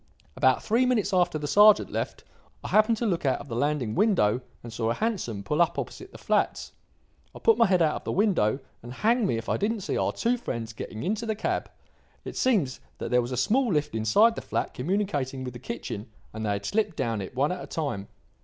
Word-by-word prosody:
"About 130 -1 +3
three 230 +4 +2
minutes 230 -6 +1
after 175 -3 +2
the 150 - -5
sergeant 210 +6 +6
left, - - -4 0.4
I - - -5
happened 215 +1 +4
to 235 - -2
look 180 -6 0
out 135 -2 +2
of 145 - -10
the 115 - -4
landing 140 -4 0
window 130 - +2 0.2
and 120 -1 -8
saw 115 -1 -1
a 115 - 0
hansom 185 - -2
pull 150 - 0
up 170 - +2
opposite - - -6
the - - -11
flats. - - 0 0.6
I - - -7
put 455 - +3
my 230 - +6
head 185 -3 +3
out 155 - +1
of - - -10
the - - -2
window, 185 - +2 0.2
and, 120 - -9
hang 225 - +2
me 115 - 0
if 115 - -6
I - - +1
didn't 215 +1 -1
see 195 - -2
our - - +1
two 240 +2 0
friends 115 - -5
getting 110 0 -7
into 215 +5 -2
the 220 - 0
cab. 210 - -2 0.6
It - - -6
seems 190 - +1 0.2
that - - -5
there 125 0 +4
was 120 +1 -5
a 125 - -2
small 235 - +2
lift 150 -2 0
inside 115 - +4
the - - -6
flat - - -3
communicating 145 -5 -2
with 125 -1 -6
the 120 - -9
kitchen, 115 -3 -6 0.2
and 110 0 -5
they 105 - -1
had 100 0 -2
slipped 210 -6 0
down 115 -3 -1
it 95 - -8
one 140 +5 +1
at 180 -1 -4
a - - -9
time. 140 -11 -3
150 Hz, 235 wpm, -27 LUFS, -, 0.6 s, sergeant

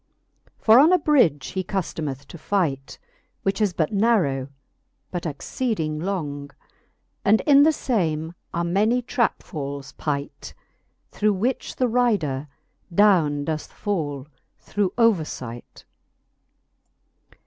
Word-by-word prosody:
For 225 +2 +6
on 310 +5 +6
a 365 - +6
bridge 245 - +2
he 190 0 -3
cuftometh 155 -8 -4
to 170 - -10
fight, 150 -8 -1 0.5
Which 195 +2 -1
is 205 -3 +3
but 165 +1 -1
narrow, 195 - +2 0.6
but 175 -2 -3
exceeding 160 - -3
long; 150 -6 -3 0.7
And 215 +2 +4
in 285 -2 +6
the 310 +1 +2
lame 165 - 0 0.2
are 170 - -1
many 210 +8 +1
trap 235 -1 0
fals 140 -4 -6
pight, 145 -2 -4 0.6
Through 210 0 +1
which 235 +7 -2
the 255 - +1
rider 205 - +1 0.4
downe 170 -7 +3
doth 155 0 -3
fall 150 -10 -3 0.3
through 200 -3 -2
overfight. 155 - -1
175 Hz, 115 wpm, -23 LUFS, 145-220 Hz, 0.7 s, For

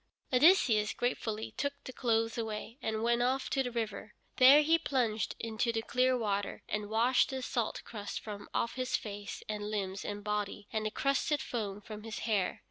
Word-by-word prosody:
Odysseus 250 - +5
gratefully 220 -3 -2
took 285 +1 0
the 255 - -8
clothes 225 -2 +1
away, 225 +2 -4
and 220 0 -2
went 235 +1 +2
off 260 +2 0
to 270 - +2
the 250 - -1
river. 220 -3 -4 0.2
There 275 +4 +8
he 325 +2 +4
plunged 240 -8 0
into 230 +1 -1
the 225 -1 -2
clear 255 +2 +2
water, 205 -3 -2
and 210 -1 -3
washed 235 +4 +3
the 265 -1 -4
salt 235 -3 -2
crust 205 -3 -5
from 205 -2 -8
off 235 - 0
his 255 0 -1
face 205 -1 -7
and 210 -1 -3
limbs 195 -2 -3
and 205 0 -5
body, 210 0 -2
and 215 -1 0
the - - -1
crusted 275 +5 +1
foam 210 -6 -4
from 215 0 -8
his 220 0 -6
hair. 205 -5 0
225 Hz, 185 wpm, -32 LUFS, 210-250 Hz, 0.2 s, There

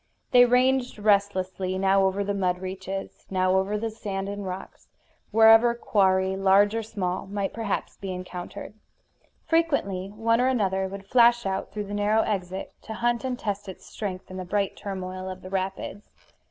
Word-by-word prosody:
They 245 0 +8
ranged 250 0 +2
restlessly, 190 -3 +1
now 195 0 +3
over 190 +1 0
the 200 0 -1
mud 185 -2 0
reaches, 190 +1 -6
now 185 -1 +2
over 195 +2 +1
the 225 +1 -3
sand 195 -3 -4
and 205 0 -5
rocks, 185 0 -7 0.4
wherever 225 +2 +6
quarry, 190 -4 +2
large 195 +2 +4
or 225 - -1
small, 195 -4 -3
might 200 0 -3
perhaps 225 -3 -3
be 195 -1 -5
encountered. 180 +1 -7 0.7
Frequently 280 - +1
one 230 +3 +1
or 255 - +3
another 190 -7 +1
would 195 0 -8
flash 240 +1 +4
out 190 0 -2
through 210 0 -4
the 200 - -7
narrow 210 +2 +2
exit, 190 -2 -3
to 220 - -7
hunt 240 +2 0
and 255 -1 -2
test 205 -3 -4
its 185 - -10
strength 185 -3 -6
in 185 - -7
the 185 - -4
bright 200 +2 -1
turmoil 185 -1 -5
of 185 0 -8
the 185 - -9
rapids. 195 +1 -4
195 Hz, 170 wpm, -26 LUFS, 190-220 Hz, 0.7 s, They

